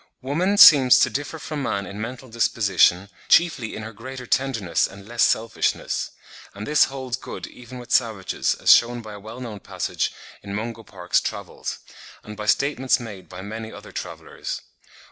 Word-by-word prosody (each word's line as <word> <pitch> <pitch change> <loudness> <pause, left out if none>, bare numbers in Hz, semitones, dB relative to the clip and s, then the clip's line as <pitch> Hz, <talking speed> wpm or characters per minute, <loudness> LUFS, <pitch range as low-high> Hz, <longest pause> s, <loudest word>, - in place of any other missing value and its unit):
Woman 175 +10 0
seems 135 -9 +9
to - - +3
differ 145 +3 -4
from 150 -1 -5
man 100 -6 -2
in 100 +2 -7
mental 125 +3 -6
disposition, 100 -5 +2 0.2
chiefly 165 -10 +3
in 110 - -6
her 110 +1 -8
greater 130 +3 -8
tenderness 115 -10 0
and 100 +1 -13
less 120 +1 -3
selfishness; 115 +1 +1 0.5
and 105 +1 -6
this 150 +3 +4
holds 130 -2 -5
good - - -7
even 125 +1 -11
with 120 -1 -11
savages, 110 -6 +1
as - - +4
shewn 120 0 +2
by 110 -1 -9
a 100 - -9
well 110 +4 -10
known 115 -5 -7
passage - - -3 0.3
in 100 0 -6
Mungo 115 +2 -4
Park's 90 -5 -1
Travels, - - -5 0.5
and 105 - -9
by 105 0 -6
statements 130 +1 +2
made 105 -6 -9
by 90 +1 -8
many 110 +2 -6
other - - -11
travellers. - - -6
115 Hz, 170 wpm, -23 LUFS, 105-130 Hz, 0.5 s, seems